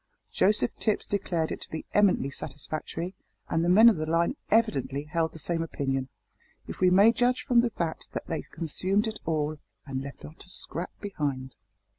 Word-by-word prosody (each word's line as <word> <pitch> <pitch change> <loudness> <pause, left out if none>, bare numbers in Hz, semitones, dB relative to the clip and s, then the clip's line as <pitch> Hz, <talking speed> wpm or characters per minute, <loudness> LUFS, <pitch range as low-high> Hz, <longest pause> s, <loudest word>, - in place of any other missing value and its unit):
Joseph 210 +2 +3
Tipps 215 -2 +1
declared 175 -5 -1
it - - -5
to - - -9
be 160 - -5
eminently 195 -9 +3
satisfactory, 155 +5 -4 0.4
and 165 - +1
the 175 - +2
men 215 +6 +8
of 230 - +6
the 155 0 -2
line 170 - +2
evidently 145 - +1
held 160 +1 -1
the - - -11
same 165 +2 -1
opinion, 135 -4 -2 0.6
if - - -8
we 185 - +5
may 200 +5 +7
judge 245 +1 +1
from 245 -4 +4
the 240 - +1
fact 170 -7 -4
that - - -4
they 165 - -3
consumed 185 +6 -1
it 220 -1 -4
all, 155 -1 -1 0.3
and 135 -2 -3
left 140 0 -9
not 155 - -10
a 180 - -14
scrap 175 -1 -3
behind. 140 -10 -3
165 Hz, 185 wpm, -28 LUFS, 150-205 Hz, 0.6 s, men